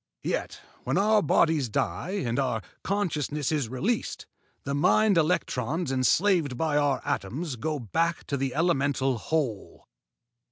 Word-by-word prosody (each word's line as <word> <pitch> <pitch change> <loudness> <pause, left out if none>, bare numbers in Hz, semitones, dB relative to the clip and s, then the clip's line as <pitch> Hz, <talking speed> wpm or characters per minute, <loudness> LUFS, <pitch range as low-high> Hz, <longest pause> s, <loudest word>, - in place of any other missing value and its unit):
Yet - - -3 0.2
when - - 0
our 210 +1 +4
bodies 155 -3 +2
die 170 - -2
and 120 +3 -1
our 125 -6 -1 0.2
consciousness 150 -8 -1
is 145 -7 -1
released, 195 - -2 0.4
the 140 - -3
mind 190 +7 +4
electrons 160 -3 0
enslaved 145 +2 +2
by 155 +1 0
our 145 -3 +1
atoms 135 - -3
go 155 +5 -2
back 165 - -1
to 140 - -2
the 135 -1 -2
elemental 140 -6 +1
Whole. 130 -7 -3
145 Hz, 130 wpm, -27 LUFS, 130-170 Hz, 0.4 s, our